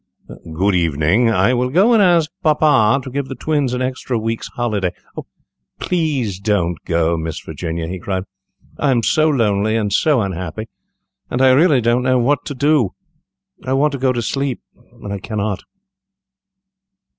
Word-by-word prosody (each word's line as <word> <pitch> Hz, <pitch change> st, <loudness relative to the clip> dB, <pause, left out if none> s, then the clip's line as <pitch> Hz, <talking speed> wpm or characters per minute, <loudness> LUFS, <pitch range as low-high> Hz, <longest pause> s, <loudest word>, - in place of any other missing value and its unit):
"Good 95 Hz, +5 st, +1 dB
evening; 85 Hz, -, +2 dB
I 110 Hz, +2 st, +2 dB
will 125 Hz, 0 st, 0 dB
go 195 Hz, -, +4 dB
and 220 Hz, -, +5 dB
ask 170 Hz, -5 st, +3 dB
papa 145 Hz, -, +3 dB
to 130 Hz, -, -7 dB
get 140 Hz, +1 st, -3 dB
the 135 Hz, -, -5 dB
twins 145 Hz, -4 st, -1 dB
an 125 Hz, -, -2 dB
extra 130 Hz, -1 st, -3 dB
week's 115 Hz, +1 st, -3 dB
holiday." 105 Hz, -7 st, -2 dB, 0.9 s
"Please 140 Hz, -, -1 dB
don't 90 Hz, -5 st, 0 dB
go, 85 Hz, 0 st, +1 dB
Miss 80 Hz, 0 st, -4 dB
Virginia," 85 Hz, -1 st, -5 dB
he 90 Hz, +2 st, -5 dB
cried; 95 Hz, +1 st, -3 dB, 0.6 s
"I 145 Hz, -, +1 dB
am 120 Hz, -3 st, +2 dB
so 155 Hz, +8 st, +3 dB
lonely 110 Hz, -5 st, +1 dB
and 105 Hz, -3 st, -1 dB
so 145 Hz, +1 st, +3 dB
unhappy, 95 Hz, +2 st, -5 dB, 0.6 s
and 125 Hz, -, -2 dB
I 130 Hz, 0 st, +5 dB
really 140 Hz, -1 st, +4 dB
don't 120 Hz, +2 st, +2 dB
know 130 Hz, 0 st, +2 dB
what 130 Hz, +3 st, +1 dB
to 145 Hz, -, -5 dB
do. 140 Hz, -6 st, +1 dB, 0.7 s
I 130 Hz, -, -2 dB
want 145 Hz, +3 st, +2 dB
to 140 Hz, -, -5 dB
go 130 Hz, 0 st, +2 dB
to 120 Hz, -2 st, -2 dB
sleep 135 Hz, 0 st, -2 dB, 0.3 s
and 100 Hz, -, -8 dB
I 100 Hz, -, -4 dB
cannot." 105 Hz, -1 st, -3 dB
120 Hz, 165 wpm, -18 LUFS, 100-140 Hz, 0.9 s, and